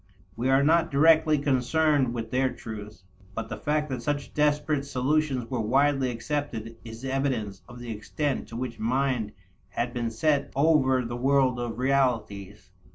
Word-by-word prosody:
We 120 Hz, +3 st, -1 dB
are 135 Hz, +1 st, +4 dB
not 165 Hz, +2 st, +3 dB
directly 155 Hz, +1 st, +4 dB
concerned 140 Hz, 0 st, +2 dB
with 115 Hz, -2 st, -5 dB
their 130 Hz, 0 st, +1 dB
truth; 105 Hz, -5 st, -9 dB, 0.3 s
but 115 Hz, -, -4 dB
the -, -, -5 dB
fact 150 Hz, 0 st, -1 dB
that 130 Hz, -3 st, -3 dB
such 145 Hz, +3 st, -3 dB
desperate 150 Hz, -1 st, +1 dB
solutions 140 Hz, -1 st, 0 dB
were 125 Hz, -3 st, -1 dB
widely 135 Hz, +3 st, +2 dB
accepted 115 Hz, -2 st, -4 dB
is 115 Hz, +2 st, -9 dB
evidence 130 Hz, -7 st, -2 dB
of 120 Hz, -, -11 dB
the 120 Hz, -1 st, -7 dB
extent 135 Hz, +6 st, -3 dB
to 115 Hz, -, -10 dB
which 120 Hz, -2 st, -5 dB
mind 125 Hz, -1 st, 0 dB, 0.4 s
had 120 Hz, +4 st, -3 dB
been 120 Hz, -1 st, -2 dB
set 140 Hz, +6 st, 0 dB
over 135 Hz, -4 st, +3 dB
the 120 Hz, +1 st, -4 dB
world 130 Hz, -1 st, +2 dB
of 120 Hz, -2 st, -4 dB
realities. 115 Hz, -8 st, -1 dB
130 Hz, 160 wpm, -27 LUFS, 115-145 Hz, 0.4 s, are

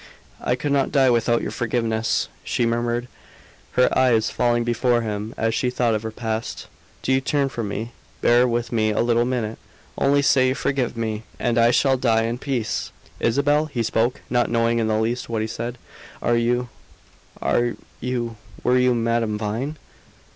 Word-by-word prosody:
"I 125 Hz, -, +1 dB
could 145 Hz, +3 st, -3 dB
not 140 Hz, -1 st, +2 dB
die 135 Hz, -3 st, +4 dB
without 120 Hz, 0 st, +2 dB
your -, -, -3 dB
forgiveness," 115 Hz, -1 st, 0 dB, 0.2 s
she 120 Hz, -, 0 dB
murmured, 120 Hz, +1 st, -1 dB, 0.7 s
her 125 Hz, -, +3 dB
eyes 120 Hz, -4 st, +3 dB
falling 120 Hz, -1 st, +1 dB
before 120 Hz, 0 st, +1 dB
him 105 Hz, 0 st, -4 dB
as 115 Hz, 0 st, 0 dB
she 125 Hz, +2 st, +1 dB
thought 125 Hz, -2 st, +1 dB
of 110 Hz, -, 0 dB
her 110 Hz, -, -4 dB
past. 110 Hz, 0 st, -4 dB, 0.4 s
"Do 130 Hz, -, +2 dB
you 130 Hz, -, +3 dB
turn 140 Hz, 0 st, +1 dB
from 115 Hz, -5 st, -4 dB
me? 110 Hz, +4 st, -4 dB, 0.3 s
Bear 120 Hz, +1 st, +4 dB
with 120 Hz, 0 st, -1 dB
me 110 Hz, -2 st, +2 dB
a 105 Hz, -, +1 dB
little 120 Hz, 0 st, +2 dB
minute! 120 Hz, -3 st, -2 dB, 0.4 s
Only 140 Hz, +1 st, +3 dB
say 130 Hz, -1 st, +4 dB
you 130 Hz, -, +1 dB
forgive 130 Hz, -5 st, -1 dB
me, 110 Hz, -2 st, -2 dB, 0.2 s
and 120 Hz, -1 st, 0 dB
I 115 Hz, 0 st, +5 dB
shall 135 Hz, +2 st, +3 dB
die 115 Hz, -3 st, +2 dB
in 115 Hz, +2 st, -2 dB
peace!" 130 Hz, -6 st, -2 dB, 0.3 s
"Isabel?" 145 Hz, +6 st, +2 dB
he 120 Hz, -6 st, -2 dB
spoke, 115 Hz, +3 st, 0 dB
not 120 Hz, 0 st, +1 dB
knowing 115 Hz, 0 st, +2 dB
in 110 Hz, -, +1 dB
the 110 Hz, 0 st, +1 dB
least 115 Hz, +3 st, -1 dB
what 110 Hz, -2 st, -1 dB
he -, -, -2 dB
said. 120 Hz, +2 st, -5 dB, 0.4 s
"Are 120 Hz, -, +1 dB
you 120 Hz, +1 st, +1 dB, 0.7 s
are 120 Hz, -, +1 dB, 0.2 s
you 120 Hz, -3 st, -3 dB, 0.3 s
were 125 Hz, +1 st, +3 dB
you 125 Hz, -1 st, +3 dB
Madame 115 Hz, -2 st, 0 dB
Vine?" 115 Hz, +8 st, -3 dB
120 Hz, 180 wpm, -23 LUFS, 115-125 Hz, 0.7 s, I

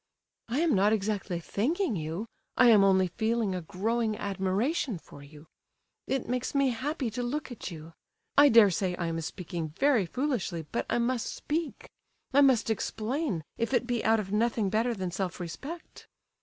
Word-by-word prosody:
"I 255 Hz, +7 st, 0 dB
am 335 Hz, -3 st, +3 dB
not 205 Hz, +1 st, +4 dB
exactly 200 Hz, -4 st, -1 dB
thanking 255 Hz, -, -1 dB
you, 165 Hz, +5 st, -3 dB, 0.3 s
I 250 Hz, -, +7 dB
am 210 Hz, -3 st, +7 dB
only 190 Hz, -1 st, +4 dB
feeling 220 Hz, +2 st, 0 dB
a 180 Hz, -, -3 dB
growing 215 Hz, +5 st, -1 dB
admiration 200 Hz, -, -1 dB
for 145 Hz, -, -14 dB
you—it 155 Hz, -, -8 dB
makes 250 Hz, +3 st, -2 dB
me 275 Hz, -2 st, +3 dB
happy 260 Hz, +1 st, -2 dB
to 245 Hz, +3 st, -3 dB
look 265 Hz, +3 st, -3 dB
at 240 Hz, -, -6 dB
you. 165 Hz, -1 st, -10 dB, 0.4 s
I 285 Hz, 0 st, +8 dB
dare 225 Hz, -5 st, +7 dB
say 180 Hz, 0 st, -1 dB
I 175 Hz, -, -3 dB
am 165 Hz, 0 st, -2 dB
speaking 165 Hz, -1 st, -5 dB
very 260 Hz, -9 st, +3 dB
foolishly, 235 Hz, -, -2 dB
but -, -, -2 dB
I -, -, +1 dB
must 240 Hz, 0 st, 0 dB
speak—I 295 Hz, -2 st, -3 dB
must 250 Hz, -5 st, +4 dB
explain, 220 Hz, -, -2 dB, 0.2 s
if 230 Hz, +3 st, 0 dB
it 245 Hz, -, +1 dB
be 240 Hz, -2 st, -1 dB
out 225 Hz, 0 st, +4 dB
of 195 Hz, -2 st, -5 dB
nothing 220 Hz, -2 st, +1 dB
better 230 Hz, +2 st, +1 dB
than 185 Hz, -3 st, -3 dB
self 190 Hz, 0 st, -3 dB
respect." 275 Hz, -, -8 dB
220 Hz, 170 wpm, -29 LUFS, 185-255 Hz, 0.4 s, I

